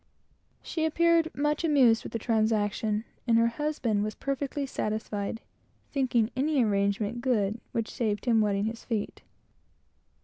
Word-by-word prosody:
She 320 - -3
appeared 335 +1 +3
much 295 +2 0
amused 265 -8 +4
with - - -8
the - - -2
transaction, 215 -1 0 0.2
and 230 -1 +4
her 230 - +4 0.2
husband 245 -9 0
was 215 0 -3
perfectly 275 +1 -3
satisfied, 215 -3 -3 0.5
thinking 245 -5 +1
any 275 0 +2
arrangement 205 +3 0
good 225 -3 0
which 230 -1 -2
saved 215 -4 -1
his 240 -2 +3
wetting 205 -1 +1
his 225 +1 -4
feet. 220 -4 -3
230 Hz, 135 wpm, -28 LUFS, 210-275 Hz, 0.5 s, amused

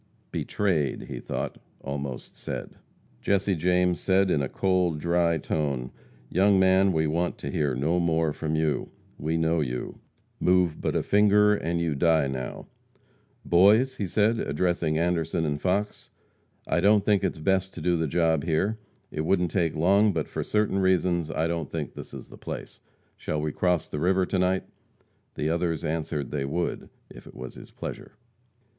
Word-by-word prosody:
"Betrayed," 85 -10 -1
he - - -7
thought, - - -4 0.2
almost 70 -2 -6
said. - - -6 0.5
Jesse 100 0 +1
James 90 +1 +2
said, 95 0 +2
in 75 - +2
a 70 - -2
cold, 90 -4 +1
dry 85 +1 +2
tone: 70 -4 -2 0.4
"Young 95 +6 +3
man, 95 +1 +4
we 80 -2 +1
want 85 +3 -1
to - - -5
hear 70 -4 0
no 80 +7 +1
more 80 -2 +1
from 80 0 -2
you. 80 -1 0 0.3
We 80 +3 -1
know 80 0 +1
you. 60 -3 -4 0.4
Move 90 -3 +2
but - - -1
a - - +1
finger 105 0 +4
and 85 -4 -1
you 85 -2 0
die 80 +1 +3
now. 65 -2 -5 0.8
Boys," 110 +9 +4
he 100 - -2
said, 110 +5 +2
addressing 85 0 0
Anderson 85 -1 0
and 75 -1 -2
Fox, 100 +3 -1 0.6
"I 80 - +1
don't 100 +2 +4
think 100 -2 +3
it 85 -5 -2
best 95 0 +1
to - - -6
do 90 -1 +1
the 80 -1 0
job 80 -1 +1
here. 95 +7 0 0.3
It 75 - -3
wouldn't 90 +1 +1
take 85 -5 0
long, 100 +6 +4
but 80 -3 -2
for - - -4
certain 105 -2 +1
reasons 90 -3 +2
I 80 0 -1
don't 85 -3 -2
think - - -4
this - - -9
is - - -9
the - - -12
place. - - -7 0.4
Shall 75 - -3
we 75 0 -1
cross 90 -2 0
the 75 - -5
river 90 +3 +2
to 95 - -1
night?" 95 +1 +1 0.7
The 75 - -1
others 85 -2 -1
answered 75 -3 -2
they 75 -2 -1
would, 85 +5 -3 0.2
if - - -13
it - - -13
was 65 0 -8
his - - -12
pleasure. - - -8
85 Hz, 175 wpm, -26 LUFS, 80-95 Hz, 0.8 s, man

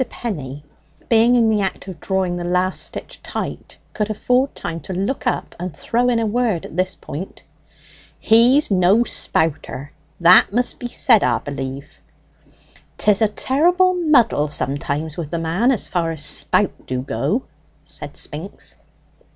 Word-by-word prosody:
Penny, 145 - -5 0.5
being 230 +1 +5
in 235 -2 +4
the 215 -2 +2
act 190 0 -3
of 180 -5 -8
drawing 190 -1 -1
the 175 - -4
last 180 +1 0
stitch - - -7
tight, - - -6 0.2
could 210 0 -2
afford 250 +5 +1
time 165 -1 -5
to 175 +5 -7
look 195 +9 -2
up - - -2
and 180 -1 -5
throw 245 +2 0
in 240 - +2
a 230 - 0
word 220 -5 0
at - - -10
this 185 +1 0
point. 155 +5 -8 0.7
"He's 240 +5 +4
no 190 +4 +4
spouter 145 - -2 0.3
that 180 +2 +6
must 245 +3 0
be 245 - -4
said, 235 -2 +3
'a - - +2
b'lieve." 140 0 -6 1.0
"'Tis 210 0 +3
a 220 - +5
terrible 350 - +2
muddle 270 - +3
sometimes 145 +2 -2
with 165 -4 -4
the 170 - -3
man, 165 +9 +1
as 255 -6 0
far 170 -2 -1
as 155 -3 -3
spout - - 0
do 130 0 -2
go," 145 - -1 0.4
said - - -7
Spinks. - - -6
190 Hz, 155 wpm, -20 LUFS, 160-235 Hz, 1.0 s, that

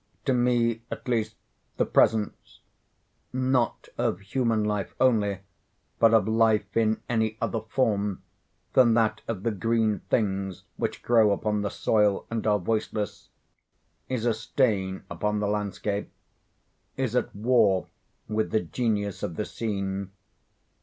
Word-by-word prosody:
To 135 - +2
me, 120 -2 +2
at - - -7
least, 110 -3 0 0.4
the - - +2
presence—not 110 -2 +2 1.6
of 90 - 0
human 115 +1 0
life 105 -2 -2
only, 105 -7 +2 0.6
but 115 -1 +6
of 110 -1 +4
life 110 -2 +2
in 110 -1 +2
any 110 -2 0
other 115 - -1
form 105 -4 0 0.5
than 120 -3 +5
that 110 -1 +2
of 105 -4 -4
the 115 - +1
green 110 0 +1
things 95 -4 -1
which - - -3
grow 115 -3 +4
upon 105 +1 0
the 100 - -1
soil 105 -2 +1
and 115 -1 -2
are 105 -1 +4
voiceless—is 105 +1 -3 1.0
a 120 - +3
stain 105 -4 0
upon 105 +5 -1
the 105 - 0
landscape—is 105 +4 -5
at 125 - 0
war 105 -4 +3 0.4
with 110 0 -1
the 110 - +1
genius 105 +1 -2
of 85 - -3
the 105 - -2
scene. 100 -3 -3
110 Hz, 125 wpm, -27 LUFS, 100-115 Hz, 1.6 s, but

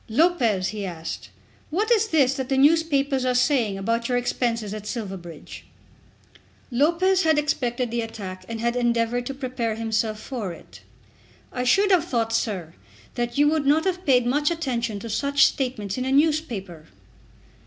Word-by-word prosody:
"Lopez," 235 - +2
he 210 -1 -5
asked, 165 -3 -6 0.4
"what 415 +9 -1
is 445 -2 +4
this 280 -8 +3
that 265 -2 -4
the 270 - +1
newspapers 280 -2 +3
are 255 -1 +1
saying 250 -6 +2
about 230 +4 -1
your 245 - +2
expenses 235 -3 -1
at 210 -1 -7
Silverbridge?" 190 - -7 1.1
Lopez 340 +9 +3
had 315 -3 +3
expected 250 -5 -1
the 235 0 -1
attack 200 -5 -7
and 230 -1 -4
had 235 +1 0
endeavoured 240 0 0
to 275 - -4
prepare 250 -4 -3
himself 220 -1 -1
for 220 -6 -5
it. - - -15 0.7
"I 250 - -2
should 395 +10 +4
have 350 -3 +4
thought, 230 -7 -1
sir, 185 -8 -2 0.4
that 240 +1 -3
you 290 +1 +5
would 305 -3 0
not 310 +4 +3
have 365 -1 -1
paid 250 -7 +3
much 290 +4 +2
attention 245 -10 -2
to 230 - -6
such 280 +6 +3
statements 245 -5 -2
in 255 - -2
a 265 - -1
newspaper." 265 - 0
245 Hz, 165 wpm, -24 LUFS, 225-290 Hz, 1.1 s, you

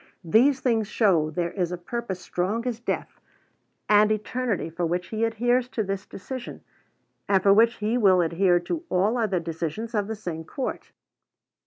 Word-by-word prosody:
These 255 - +4
things 225 -5 +1
show 180 -9 +2
there 170 +2 -2
is 180 -2 -2
a 180 - -3
purpose 190 +1 -5
strong 195 +7 -2
as 240 -3 -2
death 240 - -4 0.7
and 210 0 +5
eternity 215 -1 -1
for 165 +2 -5
which 175 +1 -1
he 220 0 -2
adheres 240 +2 +1
to 225 - -2
this 195 -1 -4
decision, 250 +5 -7 0.7
and 190 -2 +3
for 195 - +6
which 230 +3 +5
he 220 +3 -1
will 190 -5 +5
adhere 175 +2 +3
to 320 - -4
all 195 +6 +2
other 215 -7 0
decisions 165 +7 -4
of 205 -2 0
the 220 - -3
same 175 -6 -5
court. 260 - -5
205 Hz, 170 wpm, -25 LUFS, 180-230 Hz, 0.7 s, for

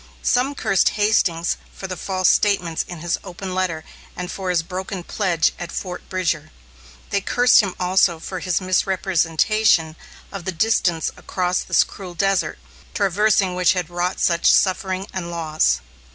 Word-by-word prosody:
Some 260 +3 +1
cursed 195 -8 +2
Hastings 185 -5 +2 0.2
for - - -7
the 185 -1 -4
false 185 0 0
statements 180 -6 +2
in 175 -3 -8
his 175 0 -1
open 185 0 -7
letter 180 -4 -1 0.3
and 180 0 -5
for 190 -2 -4
his 175 -2 +1
broken 185 +1 -5
pledge 175 -4 +1
at 175 -1 -6
Fort 180 -2 -6
Bridger. 170 -5 -1 0.6
They 200 - +1
cursed 245 +5 +4
him 195 -4 +1
also 180 -1 +3
for 185 +3 -6
his 180 0 0
misrepresentation 185 -1 +1 0.4
of 195 -4 -7
the 190 - -1
distance 175 -3 +1
across 180 -1 -1
this - - +3
cruel 185 -3 -10
desert, 195 +2 0 0.4
traversing 200 -1 +2
which 180 0 +3
had 180 -3 -3
wrought 175 +1 -2
such 170 -1 +3
suffering 190 0 +1
and 175 -2 -4
loss. 160 -2 0
185 Hz, 150 wpm, -21 LUFS, 170-195 Hz, 0.6 s, cursed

